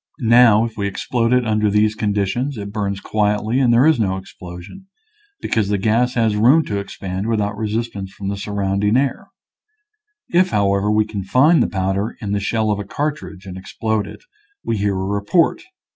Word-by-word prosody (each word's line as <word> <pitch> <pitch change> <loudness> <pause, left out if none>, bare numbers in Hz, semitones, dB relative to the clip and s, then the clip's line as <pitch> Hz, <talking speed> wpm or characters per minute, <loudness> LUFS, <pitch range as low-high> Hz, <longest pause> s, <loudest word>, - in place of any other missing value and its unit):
Now, 115 -2 +5
if 115 -2 -8
we 100 -1 -1
explode 115 +4 -1
it 125 -1 +3
under 105 -1 +1
these 105 +1 +2
conditions 110 +6 -1
it 100 -1 -6
burns 100 -2 -2
quietly 105 +4 0
and 125 -3 +3
there 120 +3 +5
is 160 -5 +4
no 95 -3 0
explosion, 95 - -11 0.5
because 105 -3 0
the 105 - +1
gas 115 +5 +1
has 115 -3 +1
room 130 +10 +4
to 100 - -2
expand 95 0 -5
without 105 -2 -1
resistance 105 -2 -4
from 100 - -8
the 100 - -2
sur 100 +1 -6
rounding 100 +2 +1
air. 135 0 -1 1.0
If, 185 -5 +2
however, 100 - +1
we 105 0 +2
confine 120 - +2
the - - +1
powder 95 +3 -2
in 105 -3 -5
the 100 - 0
shell 110 +1 0
of 105 - -1
a - - -3
cartridge 140 -5 -5
and 95 -1 -8
explode 110 +2 -2
it, - - -12 0.4
we 115 - -1
hear 100 -1 0
a 95 0 -2
report. 100 - +1
105 Hz, 185 wpm, -19 LUFS, 100-115 Hz, 1.0 s, Now